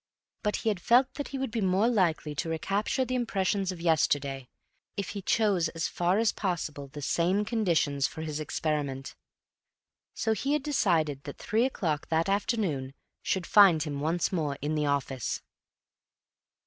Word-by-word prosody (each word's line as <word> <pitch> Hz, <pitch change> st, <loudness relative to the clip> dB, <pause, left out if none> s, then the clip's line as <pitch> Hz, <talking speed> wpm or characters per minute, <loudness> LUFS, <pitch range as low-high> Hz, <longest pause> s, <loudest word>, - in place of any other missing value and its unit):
But 210 Hz, -1 st, 0 dB
he 225 Hz, -, 0 dB
had 205 Hz, -4 st, -1 dB
felt 250 Hz, +7 st, +4 dB
that 285 Hz, -, -4 dB
he 275 Hz, -, -5 dB
would 265 Hz, -3 st, -3 dB
be 230 Hz, -1 st, -2 dB
more 190 Hz, +3 st, +3 dB
likely 175 Hz, -9 st, +1 dB
to 150 Hz, +3 st, -3 dB
recapture 200 Hz, -, 0 dB
the 255 Hz, -, -3 dB
impressions 200 Hz, -5 st, 0 dB
of 180 Hz, -, -8 dB
yesterday 140 Hz, -5 st, +1 dB, 0.5 s
if 200 Hz, -2 st, -2 dB
he 200 Hz, -, -5 dB
chose 195 Hz, -5 st, +2 dB
as 165 Hz, 0 st, -2 dB
far 175 Hz, +2 st, +1 dB
as 225 Hz, 0 st, +3 dB
possible 160 Hz, -7 st, -3 dB
the 145 Hz, +1 st, -9 dB
same 185 Hz, +8 st, +1 dB
conditions 170 Hz, -, +1 dB
for 160 Hz, -, -7 dB
his 155 Hz, -1 st, -4 dB
experiment. 145 Hz, -3 st, -3 dB, 1.0 s
So 220 Hz, -, +1 dB
he 270 Hz, +7 st, -1 dB
had 300 Hz, -2 st, 0 dB
decided 170 Hz, -, +1 dB
that 145 Hz, -, -7 dB
three 230 Hz, +2 st, +1 dB
o'clock 165 Hz, -, -2 dB
that 165 Hz, +3 st, +1 dB
afternoon 190 Hz, -, -1 dB, 0.3 s
should 185 Hz, -2 st, -1 dB
find 185 Hz, -7 st, +6 dB
him 145 Hz, -3 st, -4 dB
once 160 Hz, +3 st, 0 dB
more 150 Hz, -6 st, -1 dB
in 150 Hz, +2 st, -2 dB
the 150 Hz, -1 st, 0 dB
office. 135 Hz, -3 st, -2 dB
175 Hz, 165 wpm, -29 LUFS, 150-210 Hz, 1.0 s, find